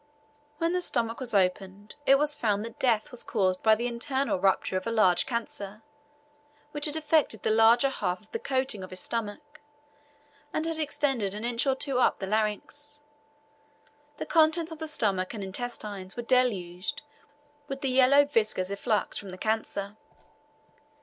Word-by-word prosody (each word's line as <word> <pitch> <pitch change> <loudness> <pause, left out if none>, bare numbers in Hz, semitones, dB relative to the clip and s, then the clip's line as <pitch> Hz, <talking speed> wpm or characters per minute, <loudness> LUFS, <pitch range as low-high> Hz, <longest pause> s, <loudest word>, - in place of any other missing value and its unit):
When 330 +2 0
the 360 - +1
stomach 230 -8 -1
was 245 -5 +1
opened, 195 +2 0
it 275 - +7
was 295 +1 +1
found 210 -1 0
that 230 0 -10
death 240 +1 +1
was 245 - -7
caused 185 -4 0
by 220 -1 +5
the 235 +2 -3
internal 245 0 -1
rupture 190 0 +1
of 185 +2 -2
a - - 0
large 200 -4 +3
cancer, 215 -4 -4 0.9
which 295 -1 -1
had 300 - -3
affected 305 - +1
the - - +2
larger 225 +4 +5
half 180 -8 -2
of 215 - -25
the - - -3
coating 260 -7 -1
of 185 - -8
his 185 - -7
stomach, 235 +10 -4 0.9
and 315 - -1
had 325 -1 -2
extended 270 -9 -1
an 215 +2 -4
inch 240 +2 0
or 265 - +3
two 265 -1 -1
up - - +3
the 195 - -4
larynx. 220 +8 -2 1.1
The - - -4
contents 325 0 +3
of 320 - -8
the 320 - -4
stomach 200 -8 -1
and 205 - -5
intestines 200 -2 -5
were 240 - -3
deluged 235 -2 0 0.6
with 275 0 -5
the 270 - 0
yellow 265 +3 +6
viscous 215 -8 0
efflux 210 +2 -1
from 200 - -9
the 185 - -8
cancer. 210 -1 -2
230 Hz, 170 wpm, -28 LUFS, 200-275 Hz, 1.1 s, it